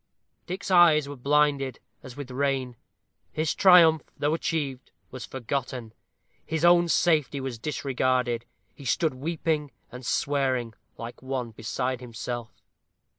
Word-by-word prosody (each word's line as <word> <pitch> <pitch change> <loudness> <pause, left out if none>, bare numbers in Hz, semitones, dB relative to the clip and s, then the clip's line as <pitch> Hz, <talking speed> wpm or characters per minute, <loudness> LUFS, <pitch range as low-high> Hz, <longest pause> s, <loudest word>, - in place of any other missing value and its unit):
Dick's 190 +2 -4
eyes 165 -5 +6
were 145 - -6
blinded, 140 -1 +1 0.2
as 130 -1 -11
with 140 -3 -7
rain. 130 -2 -1 0.6
His 155 0 -1
triumph, 170 -4 +7 0.2
though 145 +1 +1
achieved, 145 -6 -2 0.2
was 125 -3 -7
forgotten 125 -3 -4 0.5
his 160 +1 -1
own 175 0 +6
safety 155 -5 +2
was 130 -3 -5
disregarded. 130 -4 -1 0.3
He 140 - -13
stood 155 +5 +1
weeping 155 +1 -2 0.2
and 125 +2 -9
swearing, 130 +1 0 0.2
like 115 +1 -8
one 130 -3 -3
beside 125 +3 -3
himself. 120 -1 -6
135 Hz, 125 wpm, -26 LUFS, 125-155 Hz, 0.6 s, triumph